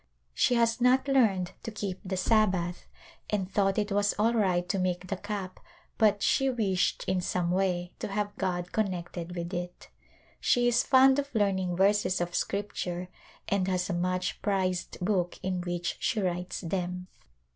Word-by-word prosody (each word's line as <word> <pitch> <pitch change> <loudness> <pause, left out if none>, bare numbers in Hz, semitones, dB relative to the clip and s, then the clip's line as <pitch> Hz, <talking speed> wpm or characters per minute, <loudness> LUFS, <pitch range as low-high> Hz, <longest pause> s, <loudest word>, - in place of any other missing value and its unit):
She 245 - +3
has 230 0 +2
not 255 +2 +4
learned 215 -10 +3
to - - -5
keep 200 -4 -4
the 190 0 -3
Sabbath 185 -3 +1 0.4
and 200 -3 0
thought 195 -1 +2
it 210 -1 0
was 205 +1 +2
all 225 +3 +3
right 185 -5 +1
to 195 - -1
make 180 0 -1
the 195 - -1
cap 195 -1 -5 0.4
but 210 -3 +3
she 270 0 +3
wished 205 -7 0
in 185 -1 0
some 175 -1 -1
way 180 -1 0
to - - -3
have 205 0 -2
God 175 -2 -2
connected 175 -4 -3
with 170 +1 -4
it. 175 0 -5 0.5
She 245 0 +3
is 240 0 +4
fond 265 +1 +5
of 280 0 -3
learning 190 -4 +1
verses 195 0 +2
of 175 0 -2
Scripture 185 -3 -3 0.4
and 195 -2 +1
has 185 0 0
a - - -1
much 180 +1 -1
prized 185 -3 -1
book 180 -2 0
in 185 -1 -1
which 175 0 -3
she 225 - 0
writes 180 -2 -2
them. 180 0 -3
190 Hz, 165 wpm, -29 LUFS, 180-210 Hz, 0.5 s, fond